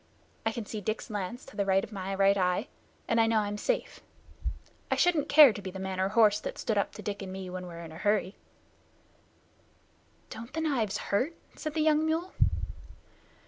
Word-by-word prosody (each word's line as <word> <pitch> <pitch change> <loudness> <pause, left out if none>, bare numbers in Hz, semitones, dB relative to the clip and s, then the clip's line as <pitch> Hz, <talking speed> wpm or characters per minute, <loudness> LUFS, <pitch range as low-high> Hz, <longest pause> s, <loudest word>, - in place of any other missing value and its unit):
I - - +2
can 225 -1 -5
see 215 0 -5
Dick's 215 +3 -3
lance 205 +4 -4
to - - -14
the 200 - +1
right 195 0 +3
of - - -7
my 195 -1 -4
right 195 0 +4
eye, 185 +7 +1 0.4
and 230 - +3
I 225 - +4
know 225 0 +3
I'm 205 -1 0
safe. - - -2 0.9
I - - +2
shouldn't 340 -5 +2
care 290 -5 +9
to 205 - -7
be 190 - -5
the 190 - -8
man 190 -1 -4
or 190 +1 +2
horse 215 -1 +5
that - - -5
stood 220 - -1
up 200 - +1
to - - -8
Dick 205 -1 -4
and 190 -1 -6
me 190 -1 -6
when 180 0 -5
we're 170 -1 -8
in 160 - -9
a 160 - -10
hurry." 205 -1 +1 2.0
"Don't 230 +3 -8
the 320 - -1
knives 250 -10 0
hurt?" 260 +12 -1 0.2
said 310 0 -5
the 315 - +2
young 310 0 +4
mule. 325 +3 -1
210 Hz, 205 wpm, -29 LUFS, 190-250 Hz, 2.0 s, care